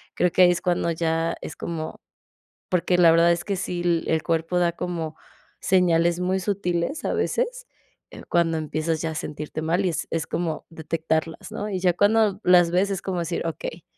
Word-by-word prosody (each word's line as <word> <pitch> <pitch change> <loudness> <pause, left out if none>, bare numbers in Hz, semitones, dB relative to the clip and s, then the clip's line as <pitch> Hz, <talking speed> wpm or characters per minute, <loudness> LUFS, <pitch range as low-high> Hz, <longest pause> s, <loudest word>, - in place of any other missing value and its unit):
Creo 180 - +2
que 185 - +3
ahí 180 - +7
es 175 - 0
cuando 175 -2 0
ya 165 0 0
es 155 - -7
como, 160 -2 -5 0.7
porque, 180 0 +1
la 170 -2 +7
verdad 170 +1 +5
es 170 0 -3
que 200 0 -2
sí, 180 -1 -3 0.3
el 160 -1 +1
cuerpo 165 +1 0
da 175 -1 +3
como 170 -2 -4 0.4
señales 175 -2 +2
muy 185 +1 0
sutiles 190 - -2
a - - -1
veces, - - -1 0.4
eh, - - -11
cuando 170 -1 +2
empiezas 155 +1 -2
ya 165 - -1
a - - -7
sentirte 150 +1 -5
mal, 165 +5 +1
y - - +2
es 165 - -3
es 165 -1 -2
como 165 -3 -3
detectarlas, 160 0 -3
¿no? 210 - -4
Y 190 -2 -2
ya 180 -1 +4
cuando 205 +1 +3
las 175 -2 +6
ves 185 +3 +2
es 195 -2 -2
como 185 -2 -3
decir: 170 0 -3
"Okey, 165 0 -5
170 Hz, 195 wpm, -24 LUFS, 165-185 Hz, 0.7 s, ahí